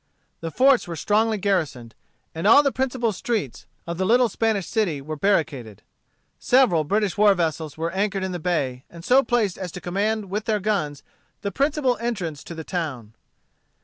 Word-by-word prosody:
The 165 - -4
forts 260 +3 +3
were 170 - -5
strongly 215 +6 +1
garrisoned, 160 - -1 0.4
and 165 +5 -2
all 285 +7 +7
the 280 - +2
principal 255 -3 -1
streets 205 - -3 0.2
of 170 +1 -5
the - - +1
little 245 +2 +4
Spanish 215 -3 0
city 200 -10 -1
were 155 +3 -6
barricaded. 145 - -1 0.6
Several 245 -11 +3
British 205 +5 -1
war 205 -1 +6
vessels 160 -3 -2
were 165 +1 -2
anchored 195 0 -1
in 190 - -2
the 175 - -4
bay, 140 -7 -1
and 170 0 -12
so 260 +2 +5
placed 235 -8 0
as 180 -2 -5
to - - -6
command 200 +3 -2
with 210 +2 -2
their 215 -2 +1
guns 180 -9 -2 0.4
the 200 - -2
principal 275 - +1
entrance 190 -11 -4
to 170 - -8
the 160 - -6
town. 145 - -4
195 Hz, 180 wpm, -23 LUFS, 160-220 Hz, 0.6 s, all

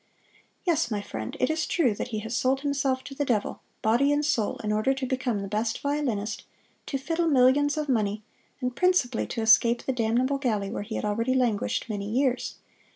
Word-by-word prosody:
"Yes, 330 -9 +2
my 210 -3 -1
friend, 110 - -6
it 255 - +2
is 315 +1 -1
true 275 - +2
that - - -4
he 220 - -4
has 225 +2 -4
sold 265 +2 +1
himself 275 -2 0
to 275 - -8
the 290 - -1
devil, 235 -7 -1 0.2
body 240 +6 +3
and 295 +1 +1
soul, 225 -8 0
in 210 - -1
order 215 +6 +2
to 270 0 -3
become 250 -5 -1
the - - -4
best 220 +3 -1
violinist, 255 -8 -2 0.4
to 275 - -1
fiddle 330 +5 -1
millions 285 +1 +4
of 305 -1 -1
money, 215 -4 0 0.4
and 250 -1 -2
principally 360 -10 +2
to 230 - -3
escape 230 +2 +5
the 265 - -1
damnable 250 +4 +1
galley 215 -7 -1
where - - -3
he 220 +2 -6
had - - -2
already 230 +5 0
languished 240 -3 0
many 205 -2 -4
years. 255 +2 0
250 Hz, 200 wpm, -27 LUFS, 220-275 Hz, 0.4 s, escape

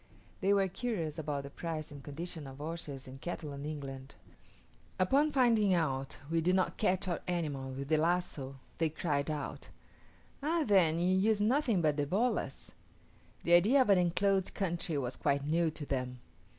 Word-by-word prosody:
They 195 +1 +2
were 200 -1 +4
curious 175 -7 -3
about 145 -2 -2
the 140 - -8
price 155 -1 -5
and 145 -1 -9
condition 160 +1 -6
of 135 0 -10
horses 150 -3 -6
and 135 +1 -10
cattle 155 -4 -5
in 140 +1 -6
England. 135 -3 -6 0.8
Upon 275 +11 +3
finding 230 -8 +4
out 135 -5 -1
we 165 0 +2
did 180 +3 +3
not 185 - +1
catch 190 -2 +1
our 175 - -1
animals 145 -7 -2
with 140 0 -4
the 155 +1 +3
lazo, 160 -5 0 0.2
they 165 -1 +2
cried 150 -2 -1
out, 150 -3 -4 0.7
"Ah, 320 +3 +1
then, 175 -6 +4
you 180 +2 +3
use 210 +2 +3
nothing 225 - +2
but 150 -1 +2
the 145 -1 0
bolas:" 225 - -1 0.7
the 170 - +3
idea 210 +11 +6
of 210 - +2
an 190 - +6
enclosed 190 +2 +1
country 175 -4 -1
was 125 -2 -2
quite 140 0 0
new 165 +2 +2
to 155 -1 -6
them. 125 -2 -2
165 Hz, 175 wpm, -32 LUFS, 145-190 Hz, 0.8 s, idea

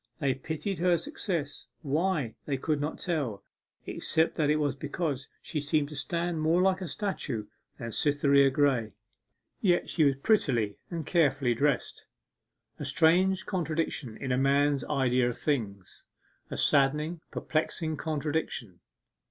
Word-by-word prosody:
They 140 -4 +1
pitied 160 +8 -4
her 175 0 +3
success, 175 - -4 0.2
why, 150 -3 0
they 140 -2 0
could 150 +2 -1
not 150 +2 -2
tell, 135 - -2 0.4
except 160 +1 0
that 150 -2 +1
it 150 - +4
was 145 -3 0
because 145 -1 -3 0.2
she 155 - -3
seemed 145 0 0
to 150 - -8
stand 170 +3 -2
more 160 +3 +3
like 190 0 +2
a 185 - -3
statue 140 - -3 0.3
than 115 -2 -5
Cytherea 140 0 +4
Graye. 130 -6 +1 0.7
Yet 180 -4 +2
she 160 - +2
was 140 -2 +4
prettily 120 - +2
and 165 -3 -4
carefully 145 -7 +2
dressed; 140 +2 -1 0.7
a - - -4
strange 185 +4 +3
contradiction 160 - -2
in 135 - -3
a 125 - +2
man's 140 0 +3
idea 130 -3 +2
of 120 - -5
things 105 - -3 0.5
a - - -5
saddening, 150 +4 +2
perplexing 155 0 -1
contradiction. 150 - -3
150 Hz, 140 wpm, -29 LUFS, 135-165 Hz, 0.7 s, it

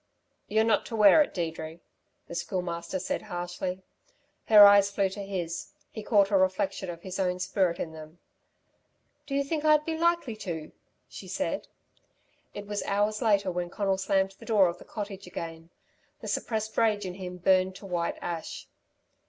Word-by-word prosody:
"You're 220 +1 +2
not 220 -2 +2
to 225 - -5
wear 210 +7 +7
it, 295 - +1
Deirdre," 160 -1 -4 0.5
the - - -8
Schoolmaster 170 -1 -3
said 185 - -3
harshly. 180 +1 -5 0.6
Her 210 -2 +10
eyes 200 0 +7
flew 200 -1 0
to 200 +2 -7
his. 180 -4 -4 0.2
He 220 - -6
caught 205 -2 +3
a 200 - +5
reflection 190 0 0
of 170 -1 -7
his 190 0 -6
own 180 -1 0
spirit 185 -1 0
in 160 - -3
them. 155 +1 -11 1.1
"Do 275 - -3
you 280 - +2
think 300 +2 -2
I'd 305 -1 +4
be 325 - -2
likely 335 -7 +1
to," 165 -7 -6 0.4
she - - -10
said. - - -3 0.9
It 205 - -6
was 205 0 -3
hours 210 +2 0
later 200 -5 +2
when 175 0 -3
Conal 195 +1 -1
slammed 195 0 +1
the - - -12
door 210 -5 +5
of 170 - -7
the - - -13
cottage 200 -3 -7
again. 165 -1 -7 0.5
The - - -8
suppressed 220 -1 -2
rage 215 -3 +2
in 180 - -4
him 180 -1 -7
burned 185 +1 +3
to 195 - -11
white 175 -3 -2
ash. 170 -2 -5
190 Hz, 175 wpm, -28 LUFS, 175-210 Hz, 1.1 s, Her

